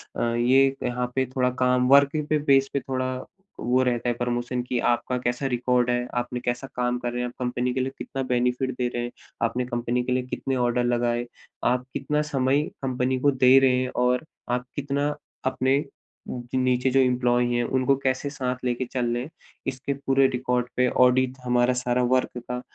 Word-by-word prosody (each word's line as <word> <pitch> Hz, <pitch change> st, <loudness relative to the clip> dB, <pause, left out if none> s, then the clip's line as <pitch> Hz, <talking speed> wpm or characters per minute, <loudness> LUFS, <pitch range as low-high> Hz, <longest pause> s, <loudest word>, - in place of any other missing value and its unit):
अ, -, -, -3 dB
ये 130 Hz, +3 st, +5 dB, 0.2 s
यहाँ 125 Hz, 0 st, -1 dB
पे 130 Hz, 0 st, +2 dB
थोड़ा 125 Hz, -1 st, +2 dB
काम 125 Hz, 0 st, +3 dB
वर्किंग 140 Hz, +2 st, +4 dB
पे 155 Hz, -1 st, +2 dB
बेस 135 Hz, 0 st, +5 dB
पे 140 Hz, -, +1 dB
थोड़ा 130 Hz, -1 st, -2 dB, 0.4 s
वो 125 Hz, +2 st, +2 dB
रहता 120 Hz, -1 st, 0 dB
है -, -, +2 dB
प्रमोशन 120 Hz, 0 st, -1 dB
कि 125 Hz, -, -1 dB
आपका 125 Hz, +1 st, -1 dB
कैसा 120 Hz, +3 st, -1 dB
रिकॉर्ड 125 Hz, -1 st, +1 dB
है, 120 Hz, 0 st, 0 dB
आपने 125 Hz, 0 st, -2 dB
कैसा 120 Hz, +2 st, -2 dB
काम 125 Hz, 0 st, 0 dB
कर 120 Hz, -1 st, -3 dB
रहे 120 Hz, -, -3 dB
हैं, 125 Hz, -, -1 dB
आप 120 Hz, -, -9 dB
कंपनी 125 Hz, 0 st, -1 dB
के 130 Hz, -, -1 dB
लिए 130 Hz, +1 st, -1 dB
कितना 135 Hz, -, -4 dB
बेनिफिट 125 Hz, +2 st, +1 dB
दे 125 Hz, -1 st, 0 dB
रहे 120 Hz, -, -2 dB
हैं, 120 Hz, -, -4 dB, 0.3 s
आपने 125 Hz, +2 st, -1 dB
कंपनी 120 Hz, 0 st, -1 dB
के 125 Hz, -, -3 dB
लिए 125 Hz, 0 st, +1 dB
कितने 135 Hz, +1 st, -3 dB
ऑर्डर 120 Hz, -1 st, +1 dB
लगाए, 120 Hz, 0 st, 0 dB, 0.4 s
आप 125 Hz, 0 st, +1 dB
कितना 150 Hz, +2 st, 0 dB
समय 135 Hz, 0 st, +2 dB, 0.2 s
कंपनी 130 Hz, 0 st, 0 dB
को 145 Hz, +2 st, +3 dB
दे 130 Hz, 0 st, +5 dB
रहे 130 Hz, -1 st, +4 dB
हैं 130 Hz, -, -2 dB, 0.2 s
और 125 Hz, +4 st, +1 dB, 0.3 s
आप 125 Hz, 0 st, -1 dB
कितना 145 Hz, +1 st, -1 dB, 0.3 s
अपने 130 Hz, +1 st, +2 dB, 0.5 s
उ 125 Hz, -, -4 dB, 0.2 s
नीचे 130 Hz, 0 st, +2 dB
जो 135 Hz, +1 st, +3 dB
एम्प्लॉय 125 Hz, -1 st, +2 dB
है 120 Hz, -, +1 dB
उनको 130 Hz, +3 st, +2 dB
कैसे 130 Hz, +2 st, 0 dB
साथ 130 Hz, -3 st, -2 dB
लेके 125 Hz, +1 st, -1 dB
चल 125 Hz, -2 st, -1 dB
रहे 120 Hz, +1 st, -2 dB
हैं। 140 Hz, -, -9 dB, 0.4 s
इसके 135 Hz, +2 st, -2 dB
पूरे 135 Hz, -1 st, +2 dB
रिकॉर्ड 125 Hz, -1 st, -1 dB
पे 125 Hz, 0 st, +3 dB, 0.2 s
ऑडिट 130 Hz, +1 st, +2 dB
हमारा 125 Hz, 0 st, +3 dB
सारा 125 Hz, 0 st, 0 dB
वर्क 130 Hz, -1 st, 0 dB
का 125 Hz, 0 st, -3 dB
125 Hz, 200 wpm, -25 LUFS, 125-130 Hz, 0.5 s, ये